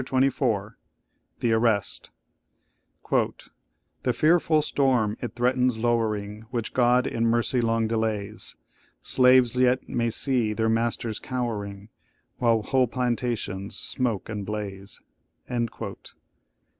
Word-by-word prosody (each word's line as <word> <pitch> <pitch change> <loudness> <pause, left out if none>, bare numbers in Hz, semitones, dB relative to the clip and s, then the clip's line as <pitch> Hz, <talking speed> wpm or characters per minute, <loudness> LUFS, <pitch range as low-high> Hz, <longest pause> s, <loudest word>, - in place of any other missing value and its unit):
CHAPTER 130 - -3
XXIV 110 -6 -1 0.7
THE 115 -2 +2
ARREST 110 -2 0 1.0
"The 120 - -3
fearful 155 +2 +3
storm 125 -8 +1
it 120 - -5
threatens 125 0 +2
lowering, 110 -2 -1
Which 120 -2 -3
God 125 0 +3
in 115 -2 0
mercy 120 +2 +1
long 115 -1 +1
delays; 110 -2 -2 0.5
Slaves 125 -1 +5
yet 125 0 +2
may 115 -1 0
see 120 -2 +1
their 110 +1 0
masters 115 -1 -1
cowering, 105 -5 -4 0.5
While 115 -3 +2
whole 130 +1 +2
plantations 120 -5 -2
smoke 120 -6 -1
and 105 -2 -4
blaze!" 100 -1 -6
115 Hz, 105 wpm, -26 LUFS, 105-125 Hz, 1.0 s, Slaves